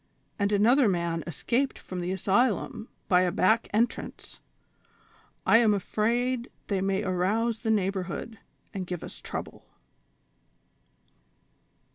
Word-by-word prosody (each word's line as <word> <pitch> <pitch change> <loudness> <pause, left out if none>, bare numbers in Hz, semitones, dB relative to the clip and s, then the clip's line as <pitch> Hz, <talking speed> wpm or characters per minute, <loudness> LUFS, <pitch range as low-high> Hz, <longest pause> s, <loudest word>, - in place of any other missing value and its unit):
and 200 0 +1
another 230 +6 +4
man 170 -2 -1
es 165 -3 -7
caped 260 +3 +1
from 185 - -7
the 175 +1 -2
asylum 205 +4 0 0.2
l)y 180 0 +6
a 180 -1 +2
back 220 +5 +2
entrance; 225 +3 -2 1.1
I - - +6
am 220 -3 +4
afraid 235 +5 0 0.2
they 195 -2 0
may 195 0 0
arouse 210 +5 0
the 220 - -3
neighborhood, 195 +1 -1 0.3
and 190 -3 -4
give 175 -2 -5
us - - -8
trouble." - - -6
200 Hz, 120 wpm, -27 LUFS, 185-230 Hz, 1.1 s, l)y